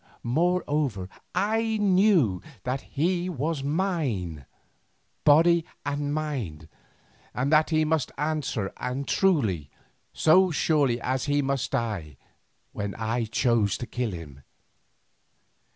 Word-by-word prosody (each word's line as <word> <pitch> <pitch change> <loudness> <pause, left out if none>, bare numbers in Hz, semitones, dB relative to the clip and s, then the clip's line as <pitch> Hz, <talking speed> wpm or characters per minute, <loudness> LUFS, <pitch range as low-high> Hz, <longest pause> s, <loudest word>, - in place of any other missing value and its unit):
Moreover, 145 - 0 0.3
I 220 +3 +1
knew 185 - +3 0.2
that 130 +2 -2
he 175 +4 -1
was 155 -2 -2
mine, 140 - -2 0.8
body 165 +3 +5 0.2
and 145 0 -2
mind, 130 - -3 0.7
and 135 +5 0
that 155 0 +5
he 155 -1 +2
must 155 -3 0
answer 145 -9 -2
and 130 +2 -3
truly, 110 - +1 0.4
so 185 +4 +4
surely 145 -6 +2
as 130 +2 -1
he 145 0 +1
must 135 -2 -1
die 95 - -3 0.5
when 100 -1 -4
I 115 +1 -1
chose 115 -3 +1
to 120 - -5
kill 120 -1 -2
him. 80 -7 -9
140 Hz, 110 wpm, -26 LUFS, 115-160 Hz, 0.8 s, body